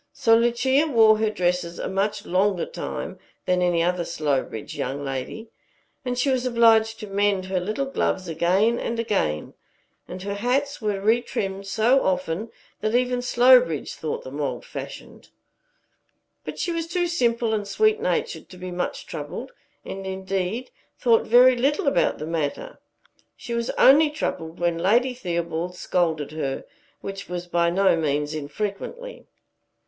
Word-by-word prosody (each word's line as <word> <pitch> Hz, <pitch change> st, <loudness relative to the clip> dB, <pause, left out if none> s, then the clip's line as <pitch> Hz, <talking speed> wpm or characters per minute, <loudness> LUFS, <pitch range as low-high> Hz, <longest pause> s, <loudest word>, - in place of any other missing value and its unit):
So 225 Hz, -2 st, +4 dB
Lucia 250 Hz, +6 st, +2 dB
wore 220 Hz, -6 st, +5 dB
her 220 Hz, -1 st, +2 dB
dresses 180 Hz, -3 st, -1 dB
a -, -, -3 dB
much 195 Hz, +2 st, -1 dB
longer 195 Hz, -, +1 dB
time -, -, -6 dB, 0.3 s
than 180 Hz, 0 st, +1 dB
any 175 Hz, -2 st, +2 dB
other 180 Hz, 0 st, 0 dB
Slowbridge 145 Hz, -9 st, -2 dB
young 140 Hz, +3 st, -3 dB
lady: 135 Hz, -, -5 dB, 0.6 s
she 250 Hz, +3 st, +1 dB
was 255 Hz, -1 st, 0 dB
obliged 225 Hz, -2 st, +4 dB
to 215 Hz, -, -6 dB
mend 200 Hz, -1 st, +1 dB
her 190 Hz, 0 st, -1 dB
little 215 Hz, +9 st, -2 dB
gloves 190 Hz, -8 st, -1 dB
again 190 Hz, +8 st, +2 dB
and 235 Hz, -, -3 dB
again; 195 Hz, -, -1 dB, 0.5 s
and 185 Hz, +1 st, -7 dB
her 200 Hz, 0 st, -3 dB
hats 255 Hz, +7 st, -1 dB
were 210 Hz, -2 st, -1 dB
retrimmed 200 Hz, -3 st, -1 dB
so 230 Hz, +6 st, +3 dB
often 185 Hz, +3 st, -1 dB, 0.3 s
that 215 Hz, +2 st, -1 dB
even 250 Hz, 0 st, +1 dB
Slowbridge 245 Hz, -, +4 dB
thought 155 Hz, -, -4 dB
them 140 Hz, +3 st, -6 dB
old 140 Hz, -, -3 dB
fashioned. -, -, -9 dB, 1.1 s
But -, -, -7 dB
she 345 Hz, -, -1 dB
was 330 Hz, -1 st, -2 dB
too 350 Hz, +1 st, 0 dB
simple 235 Hz, -9 st, +1 dB
and 205 Hz, -2 st, -2 dB
sweet 435 Hz, -, +2 dB
natured 470 Hz, -1 st, -2 dB
to 180 Hz, -, -12 dB
be 180 Hz, 0 st, -7 dB
much 180 Hz, 0 st, -3 dB
troubled, -, -, -6 dB, 0.3 s
and 195 Hz, 0 st, -6 dB
indeed 190 Hz, +5 st, -3 dB, 0.3 s
thought 230 Hz, -2 st, +3 dB
very 250 Hz, +2 st, +7 dB
little 275 Hz, +6 st, +1 dB
about 280 Hz, -, +2 dB
the 155 Hz, -, -5 dB
matter. 165 Hz, -, -3 dB, 0.6 s
She 235 Hz, -, -6 dB
was 235 Hz, 0 st, -1 dB
only 300 Hz, +3 st, +7 dB
troubled 165 Hz, -, -4 dB
when 170 Hz, -1 st, 0 dB
Lady 235 Hz, +8 st, +3 dB
Theobald 170 Hz, -5 st, -3 dB
scolded 160 Hz, -5 st, -1 dB
her, 140 Hz, -4 st, -3 dB, 0.4 s
which 195 Hz, -1 st, -7 dB
was 175 Hz, 0 st, -4 dB
by 170 Hz, -1 st, +1 dB
no 190 Hz, +1 st, +3 dB
means 150 Hz, -1 st, -1 dB
infrequently. 205 Hz, -, -5 dB
200 Hz, 150 wpm, -24 LUFS, 175-245 Hz, 1.1 s, very